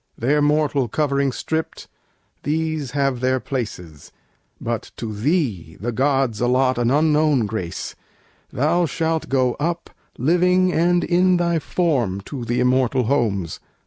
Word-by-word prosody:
their 145 +6 +2
mortal 145 -3 +2
covering 140 +1 0
stripped, 160 +5 -4 0.5
These 155 -2 -1
have 135 -3 +1
their 130 +1 +1
places; 90 - -6 0.5
but - - -3
to 110 -2 -5
thee 110 - -1
the 120 +4 -2
gods 135 -2 +1
Allot 125 +1 +2
an 120 -1 +2
unknown 150 -3 +3
grace; 100 -5 -4 0.6
Thou 165 +6 +1
shalt 160 +2 -1
go 130 -2 +2
up, 170 +3 -2 0.3
Living 180 +6 +3
and 175 +2 +2
in 180 +1 +3
thy 170 -1 +1
form, 135 - 0
to 125 +5 -7
the 120 +2 -1
immortal 130 0 +2
homes." 110 - 0
135 Hz, 130 wpm, -21 LUFS, 120-160 Hz, 0.6 s, unknown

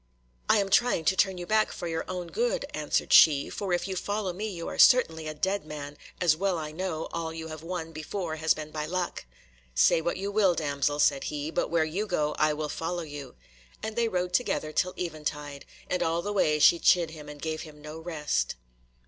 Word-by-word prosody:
"I - - +6
am 200 -1 +1
trying 240 -7 +3
to 190 - +3
turn 190 0 +2
you 175 - -5
back 215 +2 +2
for 175 - -5
your 165 -1 -2
own 180 -2 -4
good," - - 0
answered - - 0
she, 145 -3 +7
"for 195 -3 -4
if 175 +1 0
you 190 - -3
follow 205 0 -2
me 210 +5 -4
you 170 -4 -6
are - - -6
certainly 160 -11 +5
a 155 - -5
dead 190 +5 -1
man, 150 -1 -7 0.2
as 170 -4 +4
well 190 +1 0
I 155 -1 -5
know 165 -1 -3
all 165 -1 -3
you 160 0 -7
have 155 -1 -7
won 165 -1 -5
before 160 +1 -4
has 160 0 +2
been 155 0 -7
by 155 -1 -3
luck." 180 - -3 0.5
"Say 65 - +4
what 170 - -1
you 200 +1 -3
will, 200 -4 +3
damsel," 145 -2 0
said 140 -2 +2
he, 150 +1 -3
"but - - -1
where 165 -2 +2
you 190 +7 -2
go 150 -5 0
I 155 0 +4
will 150 0 -2
follow 170 +3 -3
you," 145 -3 -8 0.5
and 220 0 -4
they 235 -1 +2
rode 180 -3 -2
together 180 -7 0
till 180 +4 0
eventide, 150 -4 -5 0.2
and 180 - -1
all 165 +1 0
the 205 - -2
way 155 -6 +3
she 170 +3 +6
chid 170 -2 +4
him 150 -2 -10
and 150 0 -9
gave 155 +1 -3
him 155 -2 -11
no 150 +2 -8
rest. 150 - -1
165 Hz, 220 wpm, -28 LUFS, 155-185 Hz, 0.5 s, she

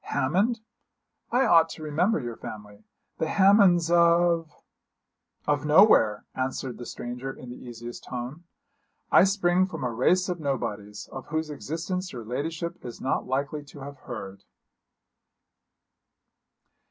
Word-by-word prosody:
'Hammond? 200 - 0 0.7
I 255 +3 +3
ought 165 -6 +5
to 155 - -8
remember 165 +7 +1
your 120 -4 -5
family 105 -1 -10 0.3
the 160 - 0
Hammonds 190 -4 +5
of 170 -1 +4 0.5
' - - -43
'Of 145 -1 +1
nowhere,' 150 - +5
answered 130 -1 -3
the 120 - -7
stranger 125 +2 -5
in 125 -2 -10
the - - -7
easiest 120 0 -9
tone; 125 +7 -6 0.7
'I 180 - +7
spring 185 -2 +2
from 190 - -6
a 125 - -1
race 180 +10 +2
of 180 -2 -3
nobodies, 105 -8 -4
of 135 - -8
whose 155 0 -2
existence 175 +5 -4
your 120 -3 -7
ladyship 165 +8 -4
is 120 - -8
not 130 - -1
likely 140 +3 -2
to 140 0 -13
have 140 +1 -8
heard.' 100 -7 -8
150 Hz, 135 wpm, -26 LUFS, 125-175 Hz, 0.7 s, I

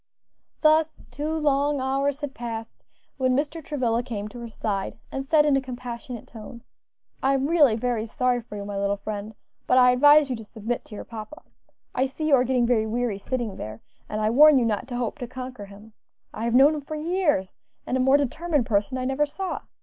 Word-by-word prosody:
Thus 315 0 +3
two 300 +2 -3
long 290 -2 +1
hours 275 +2 -1
had 290 -2 -4
passed 230 -2 -7 0.3
when 255 -1 +2
Mr. 300 +3 -2
Travilla 245 -6 0
came 215 -4 -5
to 240 - -10
her 235 -1 -7
side, 205 -2 -3
and 270 - -3
said 300 +2 +4
in 290 -2 +4
a 270 - +2
compassionate 245 -2 -7
tone, 235 +1 -11 0.6
"I 270 +1 +3
am 270 0 0
really 295 -7 +4
very 230 -1 -1
sorry 250 +1 0
for 220 -2 -11
you, 200 -1 -5
my 200 -1 -4
little 200 0 0
friend; 210 +1 -6 0.3
but 255 - +4
I 250 -1 +7
advise 290 +3 +6
you 255 - -2
to 225 - -9
submit 225 +3 -4
to 210 - -10
your - - -6
papa. 230 +7 -9 0.5
I 260 +1 +1
see 310 +4 -3
you - - +3
are 250 - +3
getting 255 -1 +2
very 230 -2 +2
weary 230 -2 -1
sitting 235 -2 -3
there, 110 +1 -7 0.3
and 215 - -3
I 215 +1 +2
warn 300 +3 +7
you 245 - +3
not 225 +2 -1
to 250 - -5
hope 245 +4 -3
to 245 - -5
conquer 255 -3 -7
him. 205 +2 -15 0.4
I 225 - -4
have 235 0 +1
known 280 +4 +7
him 300 - -4
for 310 +2 -6
years, 305 - 0 0.3
and - - -2
a - - +1
more 265 +2 +5
determined 290 0 0
person 210 +4 0
I 255 - -3
never 270 +3 +1
saw. 380 +5 -4
250 Hz, 215 wpm, -25 LUFS, 225-285 Hz, 0.6 s, I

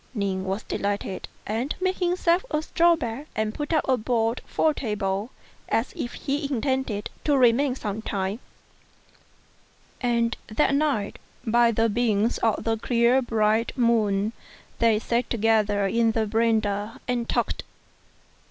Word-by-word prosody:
Ning 195 -2 -1
was 195 +3 -2
delighted, 200 -2 -3 0.2
and 230 +7 -2
made 375 0 0
himself 355 -1 +2
a 305 +1 -1
straw 340 +1 +4
bed, 255 0 -5
and 215 0 -1
put 295 +1 -4
up 315 - +1
a 260 -1 +3
board 230 0 0
for 315 - +2
a - - -5
table, 210 -4 -2 0.4
as 225 +3 0
if 240 - -4
he 280 +1 -3
intended 260 -5 -1
to 290 -2 +3
remain 255 +2 +4
some 210 -3 -4
time: 200 0 -2 1.6
and 235 -2 +1
that 270 +6 +1
night, 280 -8 0 0.3
by 235 +1 +4
the 225 +1 +2
beams 225 0 +1
of 225 -2 +1
the 225 0 0
clear 235 +3 +3
bright 225 -1 +1
moon, 220 -3 +2 0.5
they 230 -2 +4
sat 235 +2 -1
together 215 -3 +2
in 225 +3 +2
the 220 -1 +1
verandah 220 -1 0
and 240 -2 -1
talked. - - -1
230 Hz, 145 wpm, -25 LUFS, 215-255 Hz, 1.6 s, straw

